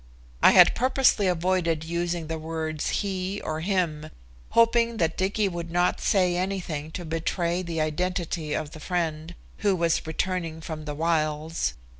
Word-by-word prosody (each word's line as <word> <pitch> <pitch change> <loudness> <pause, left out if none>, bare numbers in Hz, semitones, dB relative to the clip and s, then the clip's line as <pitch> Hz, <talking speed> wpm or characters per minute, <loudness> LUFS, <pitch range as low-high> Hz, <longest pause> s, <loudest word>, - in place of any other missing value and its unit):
I - - +7
had - - +8
purposely 255 -5 +3
avoided 175 -2 +1
using 170 0 -2
the 160 +1 -4
words 160 -1 -3
"he" 195 0 -2
or 155 0 -3
"him," 165 -4 -1 0.4
hoping 230 0 +3
that 165 -4 +1
Dicky 200 +2 +1
would 170 -2 -5
not 175 +1 +1
say 185 -4 +2
anything 180 -5 -3
to 175 - -5
betray 170 +2 -1
the 170 -3 -4
identity 165 -1 -2
of 155 -1 -3
the 155 - -10
"friend" 165 -1 -3 0.2
who 200 -2 +2
was 170 -2 0
returning 165 0 -2
from 160 -1 -6
the 150 -1 -4
wilds. 155 - 0
170 Hz, 150 wpm, -26 LUFS, 160-185 Hz, 0.4 s, had